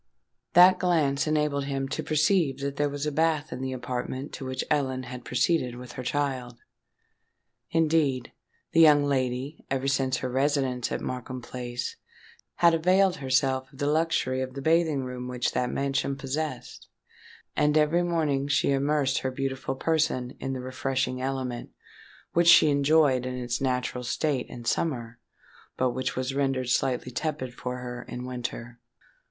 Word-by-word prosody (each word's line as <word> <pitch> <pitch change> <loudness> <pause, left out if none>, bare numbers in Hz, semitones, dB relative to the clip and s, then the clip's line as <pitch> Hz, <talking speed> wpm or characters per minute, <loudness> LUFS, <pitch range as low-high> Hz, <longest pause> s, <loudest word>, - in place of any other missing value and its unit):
That 180 +1 +7
glance 155 -6 +2
enabled 150 -2 +1
him 135 -1 -2
to - - -2
perceive 155 -2 +2
that 140 0 -3
there 145 0 +1
was 145 +1 -4
a 150 - 0
bath 155 0 +1
in 130 - -6
the 130 0 -2
apartment 130 +2 -4
to 135 - -6
which 130 0 -2
Ellen 130 -3 0
had 125 -1 -8
proceeded 125 0 +1
with 125 0 -9
her - - -6
child. 125 -2 -2 1.1
Indeed, 155 -6 +1 0.4
the 165 - +3
young 150 -3 +7
lady, 130 +1 -1
ever 135 0 -1
since 135 -1 +1
her 130 - -3
residence 135 -2 0
at - - -2
Markham 130 0 -5
Place, 120 0 -5 0.6
had 170 -1 +5
availed 185 +3 +3
herself 130 -1 0
of 135 - -17
the 145 - -1
luxury 150 -4 +1
of 130 0 -5
the 140 - -5
bathing 160 -3 +2
room 125 -1 -5
which 125 0 -1
that 125 - 0
mansion 140 0 -1
possessed: 135 0 -5 0.7
and 150 +1 +3
every 155 +3 +3
morning 155 -6 0
she 145 - +2
immersed 140 0 +1
her 130 - -2
beautiful 135 0 -3
person 140 -4 0
in 135 - -3
the 130 - -4
refreshing 130 0 -2
element, 130 -2 -3 0.6
which 170 0 +3
she 155 -3 +8
enjoyed 140 -3 +3
in 125 - -4
its 125 0 -3
natural 125 -1 -1
state 130 +2 -1
in 120 -1 -9
summer, 120 -4 -1 0.6
but 130 -1 +2
which 130 +1 -3
was 130 +1 -2
rendered 135 -2 0
slightly 125 0 0
tepid 135 -2 -3
for 125 0 -5
her 125 -1 -6
in 125 0 -6
winter. 120 -1 -6
135 Hz, 160 wpm, -27 LUFS, 125-150 Hz, 1.1 s, she